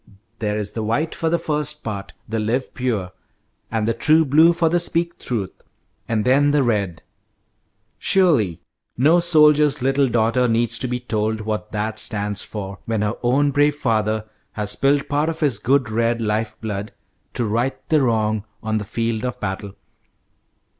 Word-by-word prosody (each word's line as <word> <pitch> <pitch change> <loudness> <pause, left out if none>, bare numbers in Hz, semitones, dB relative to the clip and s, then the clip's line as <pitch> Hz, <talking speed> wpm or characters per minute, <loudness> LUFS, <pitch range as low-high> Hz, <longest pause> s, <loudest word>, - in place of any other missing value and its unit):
There 105 -1 -1
is 105 -1 -2
the 110 - -4
white 115 +10 -1
for 165 - -1
the 170 - +2
first 150 -2 -2
part, 100 -3 -5
the 110 0 -2
'live 115 +5 -1
pure,' 110 -8 -2 0.6
and 110 -1 -1
the 115 - +2
'true 155 +7 +3
blue' 155 +5 +6
for 170 -1 +1
the 175 +2 +2
'speak 170 0 -1
truth,' 105 -7 -4 0.5
and 110 -2 0
then 140 +3 +4
the 145 -1 +3
red, 100 -8 -1 1.0
surely 145 - +2 0.4
no 155 +8 +5
soldier's 150 -4 +4
little 135 +1 +3
daughter 120 +2 +2
needs 115 0 +1
to 130 - -1
be 125 0 -2
told 110 -2 -2
what 105 0 -4
that 110 +1 -2
stands 105 -2 -2
for, 100 -2 -6
when 110 -2 -1
her 105 +1 0
own 140 +4 +2
brave 145 +1 +3
father 110 -5 0 0.3
has 105 -1 -3
spilled 140 +1 +1
part 150 +2 0
of 160 - -5
his 135 -9 +1
good 130 0 +1
red 115 +1 +1
life 110 0 -2
blood 105 -1 -5 0.4
to 120 - 0
'right 120 +5 0
the 155 -2 +4
wrong' 110 -4 +1 0.2
on 110 0 0
the - - -4
field 115 +2 -2
of 125 0 -3
battle." 95 -1 -4
115 Hz, 170 wpm, -21 LUFS, 105-145 Hz, 1.0 s, blue